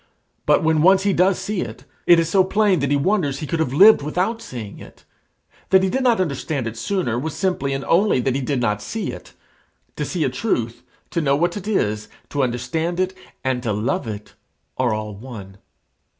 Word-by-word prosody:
But - - +4
when 160 -1 +3
once 190 +3 +5
he 200 -1 +2
does 185 +1 +3
see 210 -2 -3
it, 120 +3 -7 0.2
it 175 -1 +7
is 165 - +1
so 190 +3 +4
plain 195 -1 +2
that 140 -1 0
he 145 - +3
wonders 155 -3 +1
he 155 - -5
could 165 +2 -2
have 160 -6 0
lived 200 +9 +7
without 185 +10 -1
seeing 110 - -8
it. - - -14 0.6
That 190 0 +5
he 190 - +1
did 265 - 0
not 245 -4 +3
understand 140 -5 -2
it 115 0 -4
sooner 120 - -1
was 155 +3 -4
simply 180 -8 -1
and 135 0 -3
only 195 -3 +3
that 130 0 0
he 135 - -1
did 135 0 -1
not 105 -3 0
see 220 - -4
it. - - -11 0.6
To - - -1
see 175 -4 -2
a - - +1
truth, 120 - -2 0.3
to 170 - 0
know 140 -2 +2
what 170 +4 0
it 205 -1 -6
is, 110 - 0 0.2
to 145 - -1
understand 130 +8 -1
it, 185 0 0 0.3
and 130 -1 0
to 115 -4 -1
love 115 - -1
it, 105 -1 -7 0.4
are 130 -2 +1
all 105 0 -3
one. 100 -4 -10
150 Hz, 210 wpm, -21 LUFS, 125-185 Hz, 0.6 s, it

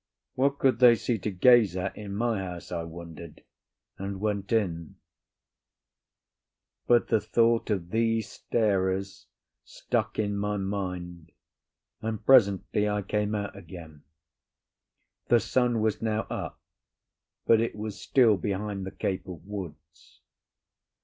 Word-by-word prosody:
What 140 +2 +1
could 130 -5 +2
they 120 -2 +8
see 115 0 -2
to 105 - -3
gaze 105 -1 +5
at 95 +1 -3
in 100 -2 -7
my 115 -1 0
house, 90 -2 -7
I 85 -2 -2
wondered, 85 -1 -10 0.6
and 95 0 -4
went 100 -1 -2
in. 85 -8 -1 1.9
But 120 -1 +4
the 110 - +3
thought 115 0 +2
of 90 -5 -2
these 115 -1 +1
starers 95 -3 -1 0.4
stuck 110 -3 -3
in 105 -1 0
my 105 0 -1
mind, 90 -4 -5 0.7
and 110 -1 -4
presently 105 -3 +4
I 105 0 -1
came 105 +2 -1
out 100 -1 -4
again. 85 -5 -11 1.3
The 120 - +5
sun 120 -2 +1
was 110 -1 0
now 110 -1 0
up, - - -5 0.9
but 115 -1 +5
it 115 - -2
was 105 -1 -6
still 115 -6 +4
behind 100 -1 -3
the - - -5
cape 95 -1 -3
of 90 -3 -9
woods. 80 -6 -9
100 Hz, 130 wpm, -27 LUFS, 95-110 Hz, 1.9 s, they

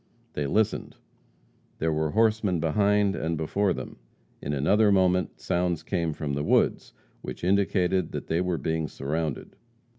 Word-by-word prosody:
They 75 -1 -2
listened. 105 +8 0 0.8
There 80 0 0
were 80 0 0
horsemen 110 -3 +2
behind 100 +5 +2
and 80 0 -2
before 95 +6 0
them. - - -5 0.4
In - - -3
another 100 +10 +3
moment, 90 -1 +2
sounds 90 -2 -1
came 85 -4 -1
from 75 -1 -4
the 70 +1 -1
woods, - - +1 0.3
which - - -7
indicated 95 -2 +1
that - - -5
they 80 +2 0
were 90 -2 -1
being 80 -1 -1
surrounded. 75 +1 -4
90 Hz, 145 wpm, -26 LUFS, 80-100 Hz, 0.8 s, another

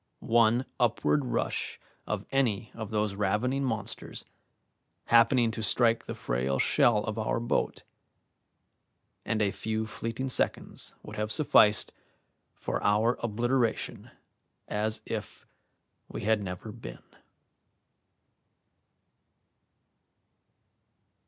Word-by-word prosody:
One 120 +2 +5
upward 125 +4 +2
rush 125 - -2 0.3
of - - -2
any 120 -5 +1
of 110 -2 -6
those 105 -2 0
ravening 105 +7 0
monsters, 115 -6 -4 0.8
happening 115 0 +5
to 110 - -5
strike 115 +1 +2
the - - -5
frail 65 +3 -1
shell 105 - +3
of 110 +1 -3
our 110 - 0
boat, 120 0 -1 1.4
and 110 -1 +1
a 100 - +1
few 110 +1 -2
fleeting 115 +4 -4
seconds - - -1
would 105 - -9
have 105 0 -1
sufficed 105 -7 +4 0.6
for - - -3
our 110 +4 +3
obliteration 120 +1 -1 0.6
as 110 +1 0
if - - -6 0.6
we - - -6
had 110 0 +2
never 95 +3 -6
been. 115 +2 -10
110 Hz, 100 wpm, -29 LUFS, 105-120 Hz, 1.4 s, One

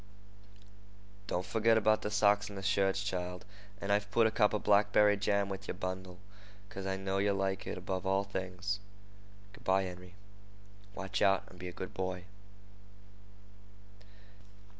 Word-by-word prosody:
"Don't 90 +1 -1
forgit 115 0 +3
about 110 0 +3
the - - -2
socks 105 -1 +3
and 100 - -8
the 95 - -6
shirts, 95 -1 +2
child; 90 -2 -4 0.3
and 100 - -2
I've 100 0 +1
put 115 +2 +4
a 110 - +3
cup 105 -2 +3
of 105 - -2
blackberry 105 0 +5
jam 100 0 +1
with 95 0 -6
yer - - -3
bundle, 95 -1 -5 0.5
because 95 -1 -6
I 95 0 -1
know 95 0 -1
yeh 100 +1 +2
like 95 -1 -1
it - - -3
above 95 -1 -3
all 95 +1 +2
things. 95 +1 -3 0.7
Good - - -15
by, 95 +1 +3
Henry. 90 0 -8 0.8
Watch 95 -1 -3
out, 95 -1 +4
and 90 - -15
be 90 - -6
a - - -5
good 95 - -7
boy." 95 -1 -3
95 Hz, 160 wpm, -33 LUFS, 95-100 Hz, 0.8 s, blackberry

